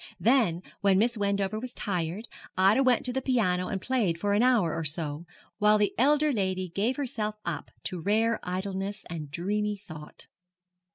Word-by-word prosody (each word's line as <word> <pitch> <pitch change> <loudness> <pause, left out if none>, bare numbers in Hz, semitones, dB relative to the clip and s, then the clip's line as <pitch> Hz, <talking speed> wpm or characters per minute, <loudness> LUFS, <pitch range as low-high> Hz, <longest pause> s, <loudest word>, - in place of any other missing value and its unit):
Then, 220 -8 +3 0.2
when 195 -2 +3
Miss 235 +4 +2
Wendover 200 0 0
was 250 +1 -5
tired, 180 +2 -2 0.3
Ida 195 +7 +5
went 255 -3 +3
to 250 - -1
the 265 - -1
piano 205 -9 +1
and 200 -3 -2
played 210 -7 0
for 200 +4 0
an 205 - +3
hour 240 -10 +3
or 165 - -2
so, 150 0 -2 0.3
while 210 0 +5
the 210 -1 +1
elder 295 +5 +3
lady 190 -5 -1
gave 210 +9 0
herself 235 -7 -2
up 170 -3 -4
to 180 -2 -4
rare 220 +5 +2
idleness 195 +2 -4
and 155 -4 -5
dreamy 205 +6 -1
thought. 155 -6 -10
200 Hz, 170 wpm, -28 LUFS, 180-230 Hz, 0.3 s, Ida